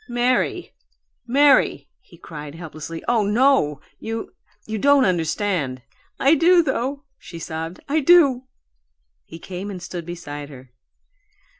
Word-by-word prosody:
"Mary, 245 Hz, +1 st, 0 dB, 0.5 s
Mary!" 275 Hz, +2 st, +3 dB
he -, -, -19 dB
cried, 150 Hz, -2 st, -9 dB
helplessly. 160 Hz, -1 st, -8 dB
"Oh 235 Hz, -2 st, +2 dB
NO 210 Hz, -, +2 dB, 0.2 s
you 225 Hz, 0 st, -5 dB, 0.3 s
you 220 Hz, 0 st, -4 dB
don't 285 Hz, +2 st, +4 dB
understand." 165 Hz, -, -1 dB, 0.4 s
"I 275 Hz, +3 st, +4 dB
do, 340 Hz, +3 st, +5 dB
though!" 275 Hz, 0 st, -2 dB, 0.2 s
she 175 Hz, -3 st, -11 dB
sobbed. 165 Hz, +1 st, -6 dB
"I 305 Hz, +3 st, +1 dB
do!" 280 Hz, -5 st, +5 dB, 0.8 s
He 165 Hz, -, -11 dB
came 185 Hz, +4 st, -7 dB
and 190 Hz, -3 st, -6 dB
stood 175 Hz, -1 st, -7 dB
beside 145 Hz, -4 st, -7 dB
her. 130 Hz, -3 st, -14 dB
200 Hz, 125 wpm, -22 LUFS, 160-265 Hz, 0.8 s, do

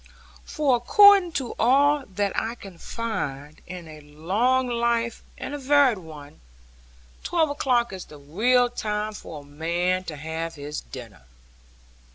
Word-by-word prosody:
For 285 Hz, -5 st, +1 dB
according 390 Hz, -, +6 dB
to 260 Hz, -4 st, -3 dB
all 280 Hz, +3 st, +3 dB
that 200 Hz, 0 st, -2 dB
I 230 Hz, +2 st, -2 dB
can 195 Hz, -7 st, -12 dB
find, 150 Hz, -, -5 dB
in 180 Hz, -2 st, -8 dB
a 155 Hz, -1 st, -11 dB
long 200 Hz, -, 0 dB
life 235 Hz, -1 st, 0 dB, 0.2 s
and 280 Hz, -, -6 dB
a 290 Hz, -, -4 dB
varied 275 Hz, -5 st, +3 dB
one, 150 Hz, -4 st, -12 dB, 0.8 s
twelve 320 Hz, -4 st, +1 dB
o'clock 245 Hz, -6 st, +1 dB
is 185 Hz, -, -7 dB
the 150 Hz, -, -13 dB
real 225 Hz, -, +2 dB
time 215 Hz, -2 st, -3 dB
for 160 Hz, -7 st, -9 dB
a -, -, -17 dB
man 170 Hz, +5 st, -1 dB
to 160 Hz, -, -6 dB
have 160 Hz, +2 st, -5 dB
his 145 Hz, +1 st, -6 dB
dinner. 115 Hz, -, -11 dB
210 Hz, 145 wpm, -24 LUFS, 160-255 Hz, 0.8 s, according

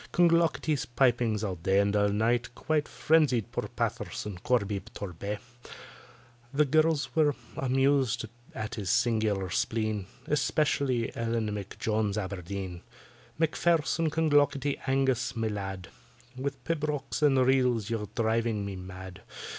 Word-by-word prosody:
CLONGLOCKETY'S 165 Hz, -4 st, +3 dB
pipings 120 Hz, -5 st, +2 dB
all 95 Hz, -5 st, -3 dB
night 95 Hz, +1 st, +3 dB
and 100 Hz, +1 st, +2 dB
all 105 Hz, 0 st, +3 dB
day 110 Hz, +4 st, +2 dB, 0.2 s
Quite 155 Hz, +1 st, 0 dB
frenzied 150 Hz, -, +2 dB
poor -, -, -3 dB
PATTISON 100 Hz, -4 st, -3 dB
CORBY 105 Hz, -2 st, +1 dB, 0.2 s
TORBAY; 100 Hz, +2 st, -4 dB, 1.1 s
The 145 Hz, +2 st, +3 dB
girls 155 Hz, +1 st, +2 dB
were 150 Hz, -3 st, +3 dB, 0.2 s
amused 135 Hz, -2 st, +2 dB, 0.3 s
at 110 Hz, 0 st, -4 dB
his 100 Hz, -5 st, -4 dB
singular 110 Hz, -5 st, +1 dB
spleen, 110 Hz, -4 st, -1 dB, 0.2 s
Especially 140 Hz, -4 st, +1 dB
ELLEN 115 Hz, -2 st, -1 dB
M'JONES 105 Hz, +1 st, -2 dB
ABERDEEN, 95 Hz, -2 st, -4 dB, 0.6 s
"MACPHAIRSON 165 Hz, 0 st, +2 dB
CLONGLOCKETTY 145 Hz, -3 st, +2 dB
ANGUS, 135 Hz, -2 st, +1 dB
my 115 Hz, -1 st, 0 dB
lad, 95 Hz, -3 st, -5 dB, 0.5 s
With 135 Hz, 0 st, -4 dB
pibrochs 150 Hz, 0 st, -2 dB
and 145 Hz, -3 st, +4 dB
reels 125 Hz, -5 st, +2 dB
you 115 Hz, -, 0 dB
are 105 Hz, -, -6 dB
driving 110 Hz, -2 st, 0 dB
me 100 Hz, -1 st, -5 dB
mad. 95 Hz, 0 st, -9 dB
115 Hz, 120 wpm, -29 LUFS, 105-145 Hz, 1.1 s, and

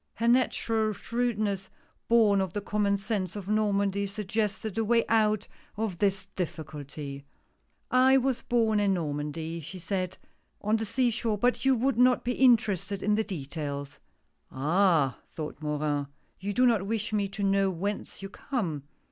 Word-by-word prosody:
Her 230 Hz, +2 st, -1 dB
natural 225 Hz, -3 st, +2 dB
shrewdness, 215 Hz, -4 st, -2 dB, 0.4 s
born 215 Hz, -4 st, +5 dB
of 190 Hz, -3 st, -3 dB
the 205 Hz, -, -2 dB
common 200 Hz, 0 st, +1 dB
sense 200 Hz, -3 st, -3 dB
of 200 Hz, -2 st, -6 dB
Normandy, 200 Hz, -1 st, +1 dB
suggested 210 Hz, 0 st, -2 dB
a -, -, +2 dB
way 230 Hz, +1 st, +3 dB
out 215 Hz, -2 st, +2 dB, 0.3 s
of 215 Hz, -5 st, -2 dB
this 195 Hz, -1 st, +1 dB
difficulty. 150 Hz, -4 st, -6 dB, 0.4 s
" -, -, -44 dB, 0.2 s
I 270 Hz, -, +7 dB
was 260 Hz, -1 st, 0 dB
born 225 Hz, -3 st, +2 dB
in 200 Hz, -2 st, +2 dB
Normandy," 160 Hz, +1 st, -3 dB
she 165 Hz, +4 st, -8 dB
said, 185 Hz, +1 st, -3 dB, 0.2 s
" -, -, -44 dB
on 215 Hz, +2 st, +2 dB
the 225 Hz, -, -2 dB
sea 240 Hz, +3 st, +1 dB
shore, 225 Hz, -2 st, -1 dB
but 245 Hz, +5 st, +1 dB
you 270 Hz, -1 st, +5 dB
would 250 Hz, 0 st, 0 dB
not 250 Hz, 0 st, +5 dB
be 245 Hz, -, 0 dB
interested 215 Hz, -6 st, +3 dB
in 210 Hz, -, +2 dB
the 220 Hz, +1 st, +2 dB
details." 145 Hz, -5 st, -5 dB, 0.5 s
"Ah 155 Hz, -1 st, +2 dB
I" -, -, -34 dB
thought 155 Hz, -1 st, -7 dB
Morin, 150 Hz, -1 st, -1 dB, 0.3 s
"you 200 Hz, +2 st, -3 dB
do 250 Hz, +6 st, +3 dB
not 220 Hz, -5 st, +2 dB
wish 220 Hz, 0 st, -2 dB
me 205 Hz, -2 st, +1 dB
to 200 Hz, +1 st, -5 dB
know 195 Hz, 0 st, +3 dB
whence 195 Hz, +2 st, -4 dB
you 195 Hz, -, -5 dB
come. 190 Hz, -, -3 dB
200 Hz, 165 wpm, -28 LUFS, 175-225 Hz, 0.5 s, I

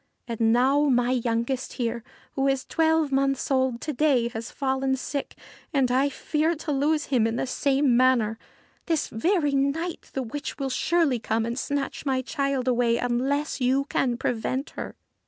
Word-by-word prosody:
And 230 Hz, -1 st, +1 dB
now 270 Hz, +5 st, +3 dB
my 245 Hz, -1 st, +2 dB
youngest 240 Hz, +1 st, -1 dB
here, 235 Hz, -2 st, -2 dB, 0.3 s
who 270 Hz, 0 st, 0 dB
is 270 Hz, -1 st, 0 dB
twelve 320 Hz, -2 st, +2 dB
months 275 Hz, +1 st, 0 dB
old 260 Hz, -3 st, +1 dB
to 305 Hz, -, -3 dB
day, 260 Hz, -4 st, +2 dB
has 225 Hz, 0 st, -6 dB
fallen 265 Hz, -1 st, 0 dB
sick, 280 Hz, +2 st, -4 dB, 0.4 s
and 260 Hz, -3 st, +3 dB
I 265 Hz, +3 st, +3 dB
fear 310 Hz, +4 st, 0 dB
to 305 Hz, 0 st, -4 dB
lose 295 Hz, +2 st, +1 dB
him 230 Hz, -3 st, +4 dB
in 225 Hz, -, -2 dB
the -, -, -1 dB
same 270 Hz, 0 st, +2 dB
manner. 235 Hz, -3 st, +3 dB, 0.5 s
This 325 Hz, -3 st, 0 dB
very 315 Hz, -, +1 dB
night 280 Hz, +5 st, -1 dB
the 265 Hz, -, -1 dB
witch 265 Hz, +5 st, -5 dB
will 270 Hz, -2 st, -2 dB
surely 310 Hz, -4 st, +1 dB
come 225 Hz, 0 st, -1 dB
and 235 Hz, +2 st, -3 dB
snatch 285 Hz, 0 st, -3 dB
my 260 Hz, -3 st, 0 dB
child 275 Hz, -2 st, -1 dB
away 240 Hz, -2 st, +2 dB
unless 265 Hz, +5 st, -1 dB
you 265 Hz, +2 st, +2 dB
can 245 Hz, -3 st, 0 dB
prevent 255 Hz, +4 st, -2 dB
her.' -, -, -7 dB
265 Hz, 170 wpm, -25 LUFS, 245-285 Hz, 0.5 s, him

